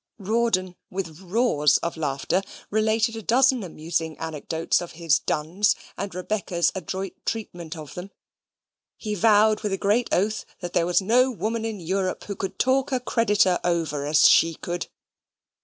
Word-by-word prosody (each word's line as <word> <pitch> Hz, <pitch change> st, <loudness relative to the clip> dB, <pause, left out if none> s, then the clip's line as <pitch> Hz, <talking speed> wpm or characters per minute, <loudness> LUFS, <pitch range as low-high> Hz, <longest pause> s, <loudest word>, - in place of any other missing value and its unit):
Rawdon, 200 Hz, -3 st, 0 dB
with 175 Hz, -4 st, -5 dB
roars 185 Hz, -, +2 dB
of 170 Hz, -, -2 dB
laughter, 150 Hz, +4 st, -1 dB, 0.3 s
related 220 Hz, +2 st, +1 dB
a 225 Hz, -, -5 dB
dozen 255 Hz, +3 st, +3 dB
amusing 160 Hz, -2 st, -3 dB
anecdotes 160 Hz, +1 st, -1 dB
of 175 Hz, -, -8 dB
his 160 Hz, -2 st, +2 dB
duns, 170 Hz, +8 st, +1 dB, 0.2 s
and 200 Hz, -2 st, -5 dB
Rebecca's 185 Hz, -2 st, 0 dB
adroit 190 Hz, +1 st, -4 dB
treatment 175 Hz, -7 st, -5 dB
of 155 Hz, -2 st, -9 dB
them. 180 Hz, +2 st, -7 dB, 0.9 s
He 215 Hz, -2 st, -4 dB
vowed 215 Hz, +1 st, +4 dB
with 210 Hz, -3 st, -2 dB
a -, -, 0 dB
great 210 Hz, +5 st, +1 dB
oath 210 Hz, +4 st, +1 dB, 0.2 s
that 175 Hz, -2 st, -6 dB
there 170 Hz, -, +2 dB
was 180 Hz, +2 st, +2 dB
no 250 Hz, +6 st, +4 dB
woman 225 Hz, -1 st, -2 dB
in 220 Hz, -3 st, -4 dB
Europe 185 Hz, +2 st, -2 dB
who 200 Hz, -, -5 dB
could 195 Hz, -, -5 dB
talk 265 Hz, +2 st, +2 dB
a 260 Hz, -, +1 dB
creditor 210 Hz, -6 st, +2 dB
over 165 Hz, -5 st, 0 dB
as 150 Hz, -1 st, +6 dB
she 165 Hz, 0 st, +5 dB
could. 175 Hz, +2 st, -4 dB
190 Hz, 155 wpm, -24 LUFS, 170-220 Hz, 0.9 s, as